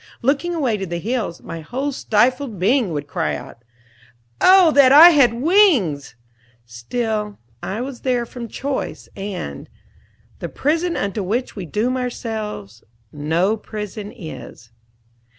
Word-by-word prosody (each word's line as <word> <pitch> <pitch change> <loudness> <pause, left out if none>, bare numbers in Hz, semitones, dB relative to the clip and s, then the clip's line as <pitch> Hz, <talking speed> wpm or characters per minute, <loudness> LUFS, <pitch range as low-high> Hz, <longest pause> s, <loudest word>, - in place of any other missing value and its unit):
Looking 295 +7 0
away 255 -9 0
to 195 -1 -5
the 170 0 -3
hills, 215 -2 -3
my 165 - -7
whole 260 - -3
stifled 245 0 0
being 215 +2 +2
would 145 -2 -3
cry 75 - -2
out 115 - -10 0.8
"Oh, 370 -3 +7
that 280 -3 +6
I 320 +5 +10
had 280 -7 +5
wings!" 250 - +2 0.5
Still 210 - -3 0.2
I 210 +5 -4
was 260 -1 -6
there 245 -2 0
from 235 0 -8
choice, 270 +4 -4
and 190 - -6 0.7
"The - - -5
prison 330 +4 -1
unto 200 +1 -2
which 225 +7 -2
we 190 -5 -6
doom 235 - -1
ourselves, 220 - -5 0.3
No 165 +8 0
prison 210 -1 -7
is." 155 - -10
225 Hz, 135 wpm, -20 LUFS, 185-265 Hz, 0.8 s, I